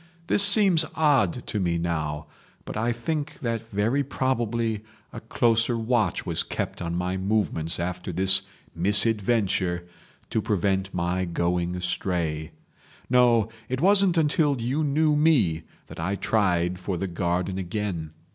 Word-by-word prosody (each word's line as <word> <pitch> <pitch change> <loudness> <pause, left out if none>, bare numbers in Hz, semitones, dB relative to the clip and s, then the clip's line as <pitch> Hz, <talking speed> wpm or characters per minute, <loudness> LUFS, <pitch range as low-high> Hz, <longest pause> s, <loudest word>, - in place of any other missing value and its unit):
This 200 - +3
seems 200 -5 +7
odd 135 - +2
to 105 - -3
me 85 -3 0
now, 80 -3 -3 0.4
but - - -7
I 115 +3 0
think 145 +6 -4
that 115 -2 -3
very 115 +7 0
probably 115 -5 -2 0.3
a - - -6
closer 115 +1 +1
watch 115 -4 0
was - - 0
kept - - -4
on 85 0 -3
my 90 +1 -2
movements 95 -5 -1
after 90 +1 -4
this 95 +2 +3 0.3
misadventure 100 -2 +2 0.4
to 110 - 0
prevent 95 -1 -1
my 90 +1 -1
going 85 +1 -1
astray. 85 -3 -2 0.6
No, 120 -3 +4 0.2
it 130 +1 -2
wasn't 195 0 +3
until 150 -3 +2
you 130 +7 -1
knew 150 +1 +2
me 125 - +2 0.2
that - - -12
I 95 +5 -1
tried 90 -4 0
for 90 0 -3
the 95 - -3
garden 90 +1 -2
again. 90 -3 -4
105 Hz, 135 wpm, -25 LUFS, 90-125 Hz, 0.6 s, seems